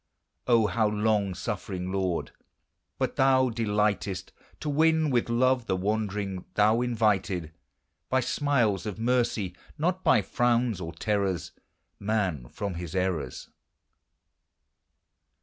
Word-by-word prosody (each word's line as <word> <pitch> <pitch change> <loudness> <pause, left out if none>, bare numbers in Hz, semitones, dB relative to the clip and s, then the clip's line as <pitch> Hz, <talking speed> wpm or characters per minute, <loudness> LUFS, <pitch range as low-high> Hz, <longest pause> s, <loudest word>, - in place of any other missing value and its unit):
O, 115 -3 +5
how 110 0 +2
long 105 -2 +1
suffering, 95 -1 -4
Lord! 95 -3 -1 0.7
but - - -2
thou 130 -1 +4
delightest 105 -4 -1 0.3
To - - -4
win 160 +1 +3
with 120 -2 +1
love 125 0 +2
the 95 - +1
wandering: 100 -1 -2
thou 110 +3 +4
invited, 105 -8 0 0.6
By 130 0 +2
smiles 120 -8 +1
of 105 - -4
mercy, 115 -5 0 0.2
not 180 +4 0
by 105 - +4
frowns 120 -1 +1
or 80 -1 -4
terrors, 95 -2 -1 0.5
Man 100 - -1
from 100 -2 -4
his 85 0 -6
errors. 90 -9 -2
105 Hz, 115 wpm, -27 LUFS, 95-120 Hz, 0.7 s, O